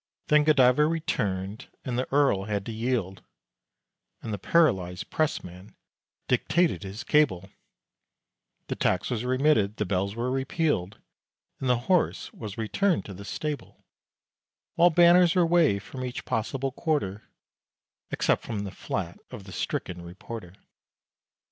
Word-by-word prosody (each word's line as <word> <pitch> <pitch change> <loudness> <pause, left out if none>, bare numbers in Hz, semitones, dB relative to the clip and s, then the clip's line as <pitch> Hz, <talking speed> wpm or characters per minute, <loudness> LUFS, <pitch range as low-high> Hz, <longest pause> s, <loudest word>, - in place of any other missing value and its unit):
Then 150 0 +5
Godiva 150 -1 +5
returned, 105 - -2 0.2
and 125 - -2
the 130 +1 -2
Earl 135 -9 +3
had 100 -2 -2
to - - -4
yield, 110 -5 -2 1.0
(And 110 - -4
the 100 - -3
paralyzed 95 - +1
pressman 95 - -3 0.5
dictated 175 0 +2
his 100 +2 -7
cable;) 100 -12 +2 1.1
The - - -3
tax 90 - 0
was 120 -2 -1
remitted, 130 -5 +2
the 105 - 0
bells 100 +2 -1
were 120 +2 -1
repealed, 135 - -1 0.6
And 130 - -2
the 125 - +4
horse 180 -3 +1
was 105 -4 -8
returned 170 - 0
to 100 - -8
the 100 +2 -9
stable; 150 +7 -5 0.9
While 175 +1 +5
banners 175 +1 +6
were 180 -2 +4
waved 165 - +3
from 130 +3 -7
each 125 0 -5
possible 130 +3 -2
quarter, 125 - -2 0.8
Except - - +1
from 110 -3 -4
the 100 - -5
flat 90 -3 -4
of 120 -6 -9
the 95 - -11
stricken 90 0 -3
reporter. 90 +2 -9
120 Hz, 135 wpm, -27 LUFS, 100-150 Hz, 1.1 s, banners